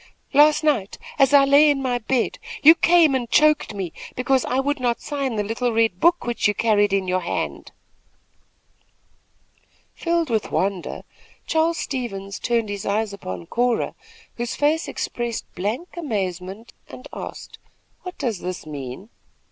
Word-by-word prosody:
"Last 300 +2 +5
night, 250 -11 0 0.2
as 270 -2 +5
I 280 -1 +7
lay 285 +2 +6
in 285 -2 +2
my 250 -2 -1
bed, 240 +2 -1 0.2
you 315 +3 +10
came 335 -3 +4
and 245 -3 -1
choked 305 -7 +3
me, 185 -5 -4 0.2
because 255 +1 +1
I 255 - 0
would 285 +1 -1
not 240 -2 0
sign 275 -5 -3
the 210 - 0
little 230 +4 -1
red 225 -5 +1
book 340 - +3
which 240 -3 +1
you 210 - 0
carried 205 -3 +2
in 195 -1 0
your 185 0 +1
hand." 175 - -4 2.2
Filled 335 -4 -1
with 220 -2 0
wonder, 195 -2 -2 0.4
Charles 325 +1 +1
Stevens 200 -9 -4
turned 230 -3 0
his 200 -1 -4
eyes 210 0 -1
upon 95 - -7
Cora, 245 - 0 0.4
whose 240 0 -3
face 305 +3 +1
expressed 235 -1 -4
blank 215 - -4
amazement, 195 - -4 0.2
and 255 - -10
asked: - - -8 0.4
"What 365 -1 -8
does 225 -7 -2
this 180 -2 -5
mean?" 145 - -7
240 Hz, 150 wpm, -22 LUFS, 200-285 Hz, 2.2 s, you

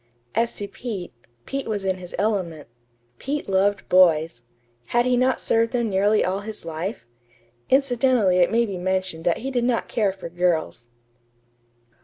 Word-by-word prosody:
As 230 +1 0
to 205 - -4
Pete 200 - -6 0.3
Pete 275 0 -4
was 205 -3 -2
in 190 -1 0
his 180 -1 -8
element. 185 -8 -1 0.5
Pete 290 +2 -3
loved 195 +1 +1
boys. 165 -7 +4 0.4
Had 240 - +1
he 250 0 +3
not 255 +1 +2
served 230 +1 +1
them 235 -3 0
nearly 205 +3 +3
all 190 +2 -1
his 210 -3 -8
life? 165 - -5 0.6
Incidentally 250 -7 +3
it 175 - +4
may 235 +1 +3
be 195 -4 -5
mentioned 185 -2 -2
that 170 - +2
he 270 - -2
did 245 -2 0
not 240 -1 0
care 210 -4 +1
for 190 -2 -9
girls. 165 -8 -1
200 Hz, 160 wpm, -23 LUFS, 180-235 Hz, 0.6 s, boys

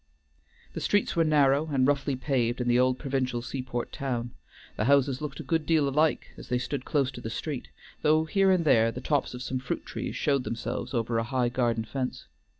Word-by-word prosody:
The - - -5
streets 205 0 +1
were 165 - +4
narrow 145 -1 +3
and 130 -2 +3
roughly 140 -1 +1
paved 125 -2 0
in 125 - -1
the 120 0 +4
old 130 0 +3
provincial 130 -4 -2
seaport 125 -1 -4
town; 120 -3 -3 0.4
the 105 - -1
houses 140 0 +3
looked 150 -1 -5
a - - -5
good 160 +3 0
deal 155 -4 +3
alike 150 +3 +1
as - - -11
they 125 - +2
stood 125 +1 -3
close 140 -3 +1
to 120 - -9
the 115 - -5
street, 140 +3 -4 0.3
though 155 +1 +3
here 195 +3 +3
and 180 -3 +3
there 115 -5 +4
the 125 - -6
tops 140 -1 -1
of 125 - -6
some 130 -1 -2
fruit 130 - -4
trees - - -5
showed 140 -3 +1
themselves 120 +1 -4
over 115 0 0
a - - 0
high 125 0 0
garden 120 -2 0
fence. 130 +2 -4
130 Hz, 210 wpm, -28 LUFS, 120-145 Hz, 0.4 s, were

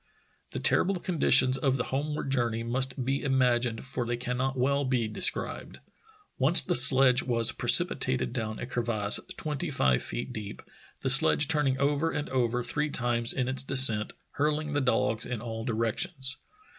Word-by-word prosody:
The - - -7
terrible 195 +1 +1
conditions 135 -7 +2
of 135 -1 0
the 125 - -2
homeward 145 0 -4
journey 120 -3 -2
must 130 +2 -2
be 135 +2 -2
imagined 125 -3 -1
for 135 -2 -4
they 120 0 -4
cannot 125 +2 -4
well 140 +3 0
be 125 -4 -1
described. 110 - -1 0.6
Once 145 +7 +5
the - - -2
sledge 130 0 +7
was 115 -3 0
precipitated 65 -1 +1
down 110 -1 -5
a - - -6
crevasse 115 -4 +1 0.2
twenty 155 +2 -5
five 65 - 0
feet - - -6
deep, 105 -1 -9 0.4
the 135 - -2
sledge 135 +2 +4
turning 150 -4 -1
over 145 +3 -1
and 145 - -5
over 125 -1 -1
three 150 +4 -3
times 120 -3 -1
in 125 -2 -2
its 130 -1 -1
descent, 130 -6 +2 0.2
hurling 150 +1 -2
the 145 - -1
dogs 115 -3 -1
in 125 -2 -5
all 115 -1 -7
di 120 - -3
rections. 130 - -2
130 Hz, 165 wpm, -27 LUFS, 115-140 Hz, 0.6 s, sledge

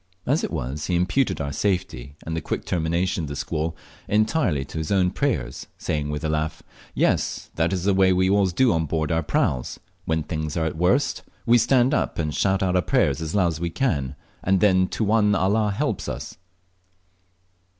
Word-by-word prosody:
As 145 +5 +1
it - - -1
was, 70 -1 -4
he 90 - 0
imputed 90 - +1
our 70 -2 -3
safety 90 -9 -2
and 80 - -3
the 80 - -2
quick - - -4
termination 85 +1 0
of - - -7
the 70 - -5
squall 80 +3 -2 0.3
entirely 105 - +1
to 80 - -6
his 80 - -4
own 95 -2 +3
prayers, 125 - -2
saying 75 -1 -2
with 75 +1 -4
a - - 0
laugh, 80 0 -2 0.3
"Yes, - - 0
that's 85 +2 0
the 100 +1 +3
way 95 0 +4
we 95 0 +3
always 100 -1 +3
do 125 +6 +3
on 80 -1 0
board 80 0 -1
our 80 0 +2
praus; 65 -4 -1 0.3
when 80 -1 0
things 80 0 -4
are 80 - +1
at 80 - 0
the 80 - -10
worst 120 +11 +2 0.2
we 120 +1 +5
stand 125 +3 +3
up - - 0
and 75 -2 -1
shout 95 -1 +1
out 90 -1 +1
our 90 - +4
prayers 80 -2 +1
as 80 +2 -3
loud 90 -4 +3
as 80 -1 -4
we 85 0 -1
can, 80 - -1 0.3
and 95 0 +3
then 95 -2 +4
Tuwan 105 0 +2
Allah 105 +3 +2
helps 100 - -2
us." - - -6
90 Hz, 200 wpm, -24 LUFS, 80-100 Hz, 0.3 s, we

